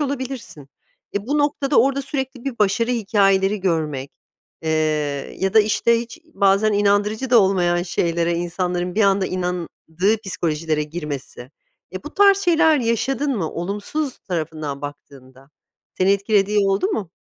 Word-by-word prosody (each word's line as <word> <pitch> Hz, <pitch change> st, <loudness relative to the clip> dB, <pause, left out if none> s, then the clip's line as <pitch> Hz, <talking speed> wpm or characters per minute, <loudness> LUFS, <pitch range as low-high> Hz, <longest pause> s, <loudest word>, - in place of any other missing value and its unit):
olabilirsin. 260 Hz, -, -5 dB, 0.5 s
E, 200 Hz, +1 st, -3 dB
bu 290 Hz, +3 st, 0 dB
noktada 290 Hz, -2 st, +2 dB
orada 275 Hz, +2 st, +1 dB
sürekli 265 Hz, -2 st, -4 dB
bir 260 Hz, -4 st, -4 dB
başarı 215 Hz, +4 st, +2 dB
hikâyeleri 200 Hz, -3 st, +2 dB
görmek, 155 Hz, -7 st, -1 dB, 0.5 s
eee, 160 Hz, -, -1 dB, 0.7 s
ya 190 Hz, +2 st, -1 dB
da, 220 Hz, -, +8 dB
işte, 230 Hz, +2 st, +2 dB
hiç 240 Hz, +8 st, -9 dB, 0.2 s
bazen 200 Hz, +2 st, +3 dB
inandırıcı 205 Hz, +4 st, +1 dB
da 240 Hz, -, +7 dB
olmayan 175 Hz, -3 st, +2 dB
şeylere 170 Hz, -1 st, 0 dB
insanların 175 Hz, +1 st, -2 dB
bir 220 Hz, -, +2 dB
anda 195 Hz, -1 st, +3 dB
inandığı 180 Hz, +2 st, -2 dB
psikolojilere 160 Hz, -4 st, -1 dB
girmesi, 150 Hz, -5 st, -7 dB, 0.4 s
eee, 185 Hz, -, -7 dB
bu 300 Hz, -, -9 dB
tarz 400 Hz, -1 st, +5 dB
şeyler 335 Hz, -4 st, +4 dB
yaşadın 260 Hz, +3 st, 0 dB
mı 165 Hz, -5 st, -2 dB
olumsuz 205 Hz, -, -3 dB
tarafından 155 Hz, -5 st, -4 dB
baktığında? 135 Hz, -2 st, -11 dB, 0.4 s
Seni 185 Hz, +1 st, +2 dB
etkilediği 200 Hz, +1 st, +2 dB
oldu 195 Hz, -, +1 dB
mu? 210 Hz, -, -3 dB
195 Hz, 135 wpm, -21 LUFS, 170-240 Hz, 0.7 s, da